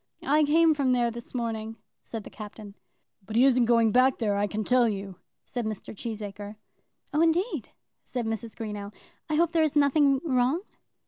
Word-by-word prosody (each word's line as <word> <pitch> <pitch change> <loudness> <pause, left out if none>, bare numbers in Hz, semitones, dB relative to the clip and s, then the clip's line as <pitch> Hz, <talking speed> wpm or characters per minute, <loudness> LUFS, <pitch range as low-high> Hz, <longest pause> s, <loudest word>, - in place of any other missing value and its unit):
"I 300 +2 +3
came 320 +2 +4
from 275 -4 +1
there 240 -1 +2
this 235 +2 -9
morning," 225 -2 -3 0.3
said 225 -2 -7
the - - -11
Captain. 210 -1 -10 0.5
"But 215 +3 -7
he 245 +3 +6
isn't 250 -3 +4
going 230 -1 +4
back 255 +3 +4
there, 210 -4 0
I 205 +1 +1
can 215 +1 -3
tell 250 0 +3
you," 195 -3 -5 0.3
said 245 - -4
Mr. 215 0 -6
Cheesacre. 210 -2 -6 0.6
"Oh, 300 - +2
indeed," 335 +7 +1 0.3
said 245 -2 -4
Mrs. 225 0 -4
Greenow; 210 -3 -6 0.4
"I 305 - 0
hope 335 +1 +2
there 330 -1 +2
is 310 -2 +1
nothing 285 -1 +4
wrong." 265 +4 +1
235 Hz, 180 wpm, -27 LUFS, 215-280 Hz, 0.6 s, he